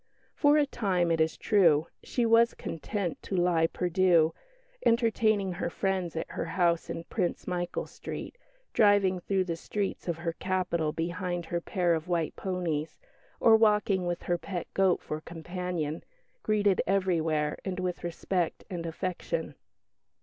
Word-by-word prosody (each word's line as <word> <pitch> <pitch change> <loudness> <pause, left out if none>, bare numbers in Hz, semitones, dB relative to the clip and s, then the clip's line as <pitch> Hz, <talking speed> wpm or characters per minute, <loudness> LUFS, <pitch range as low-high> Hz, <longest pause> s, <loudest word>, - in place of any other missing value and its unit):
For 290 0 +4
a 295 - +4
time, 185 -10 0
it 165 -1 +2
is 160 0 +1
true, 165 -8 +4 0.2
she 240 - -1
was 230 +1 +5
content 175 +2 -4
to 195 - -4
lie 175 -2 +3
perdue, 175 -2 +3 0.5
entertaining 220 -4 +2
her 175 -1 -3
friends 185 -2 -1
at 160 - -4
her - - -3
house 170 -1 +1
in 165 - -4
Prince 175 0 -2
Michael 175 -1 -2
Street, - - -7 0.4
driving 205 -3 +4
through 190 +1 0
the 170 -2 -3
streets 195 +4 -3
of 170 -2 -1
her 170 0 -3
capital 180 -4 -1
behind 175 +2 -3
her 170 +1 -2
pair 175 -1 +1
of 160 0 -2
white 170 -3 -1
ponies, 170 -5 -3 0.4
or 225 - +7
walking 210 -4 +3
with 175 0 -2
her 175 -1 0
pet 180 -2 -4
goat 190 -2 +2
for 155 0 -4
companion, 170 -1 -4 0.4
greeted 205 -3 +2
everywhere 165 -6 +1 0.2
with 180 -1 -3
respect 175 0 -2
and 170 -2 -4
affection. 185 - -3
180 Hz, 145 wpm, -29 LUFS, 165-195 Hz, 0.5 s, or